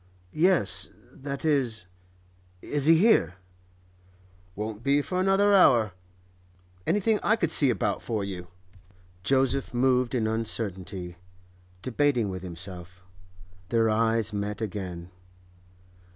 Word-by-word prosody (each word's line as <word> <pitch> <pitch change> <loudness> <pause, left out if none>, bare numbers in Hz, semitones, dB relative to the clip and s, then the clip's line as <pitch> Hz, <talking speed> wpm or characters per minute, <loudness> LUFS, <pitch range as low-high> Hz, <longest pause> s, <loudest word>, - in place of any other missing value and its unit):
'Yes. 105 - +3 0.2
That 140 +1 -6
is—Is 90 - -3
he 165 0 +7
here?' 200 - +3 1.2
'Won't 105 +1 -5
be 140 +3 +2
for 180 +4 -3
another 195 +2 +3
hour. 120 - +5 1.0
Anything 210 +4 +1
I 220 - +3
could 170 -8 -1
see 145 -4 +5
about - - -1
for 110 -4 -3
you?' 90 -3 -6 0.7
Joseph 135 +3 0
moved 125 0 +2
in 115 -3 0
uncertainty, 100 -5 -3 0.7
debating 130 -4 +1
with 95 -1 -6
himself. 90 0 -8 0.6
Their 115 -1 +2
eyes 115 -1 +1
met 105 0 -3
again. 95 -5 -6
110 Hz, 105 wpm, -26 LUFS, 95-140 Hz, 1.2 s, he